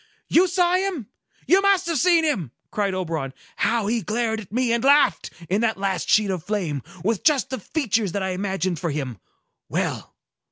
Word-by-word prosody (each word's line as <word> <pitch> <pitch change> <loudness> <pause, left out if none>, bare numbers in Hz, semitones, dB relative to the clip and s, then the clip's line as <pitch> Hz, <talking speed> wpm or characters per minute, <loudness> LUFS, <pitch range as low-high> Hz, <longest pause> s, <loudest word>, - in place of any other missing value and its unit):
"You 360 +3 +5
saw 355 0 +2
him? 370 - -3 0.4
You 380 +3 +5
must 395 -2 +3
have 335 -4 0
seen 340 0 +4
him!" 215 - 0 0.2
cried 200 -2 -1
Oberon. 160 -7 -3 0.2
"How 230 -3 +1
he 230 +2 0
glared 220 +3 -1
at 205 -4 -11
me 240 +1 +1
and 235 0 0
laughed, 285 +2 +4 0.2
in 200 +6 +1
that 225 -3 +1
last 195 -1 -2
sheet 210 -2 +4
of 180 -4 -3
flame, 175 -9 -2 0.2
with 215 +1 0
just 285 -5 +2
the 260 - -3
features 225 - -1
that 200 - -1
I 190 - -1
imagined 185 -2 -2
for 170 - -2
him! 135 - -4 0.5
Well! - - -3
215 Hz, 190 wpm, -23 LUFS, 185-290 Hz, 0.5 s, You